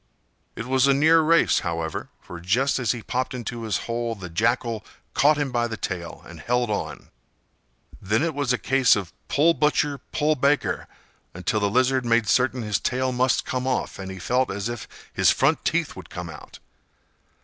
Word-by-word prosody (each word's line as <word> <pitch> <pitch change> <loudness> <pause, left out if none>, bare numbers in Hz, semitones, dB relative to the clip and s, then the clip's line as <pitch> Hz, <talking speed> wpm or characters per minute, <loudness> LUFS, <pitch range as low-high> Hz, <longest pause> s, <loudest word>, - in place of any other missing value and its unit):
It 115 - -5
was 130 +1 +3
a 140 - +4
near 160 +3 +5
race, 165 +2 +4
however, 80 -2 -4
for 85 - -9
just 120 +12 +1
as 120 -5 +1
he 120 -3 -5
popped 130 0 -2
into 120 -1 -5
his 110 -4 -1
hole, 115 0 -2
the 90 -5 -9
Jackal 115 +3 0 0.3
caught 150 +1 +4
him 145 -3 -1
by 120 -1 +1
the 110 -1 -5
tail, 85 -1 -5
and - - -11
held 120 -2 0
on. 105 - -4 0.9
Then 105 +7 +1
it 165 -1 0
was 140 -3 -1
a 125 - +2
case 135 -1 +4
of 95 -5 -5
"pull, 160 +4 +4
butcher; 150 -2 +1
pull, 155 +1 +2
baker," 140 +1 +1 0.5
until 90 +4 -1
the 100 -1 +1
Lizard 130 +3 +2
made 115 -2 +2
certain 125 +4 +2
his 105 -2 0
tail 130 0 -1
must 125 +1 +1
come 130 0 -2
off, 130 - -2
and 95 0 -6
he 95 - -7
felt 125 +7 0
as 100 +3 -3
if 120 -1 -6 0.3
his - - +4
front - - +2
teeth - - 0
would - - -11
come 85 -1 -6
out. 75 - -12
120 Hz, 190 wpm, -24 LUFS, 105-135 Hz, 0.9 s, near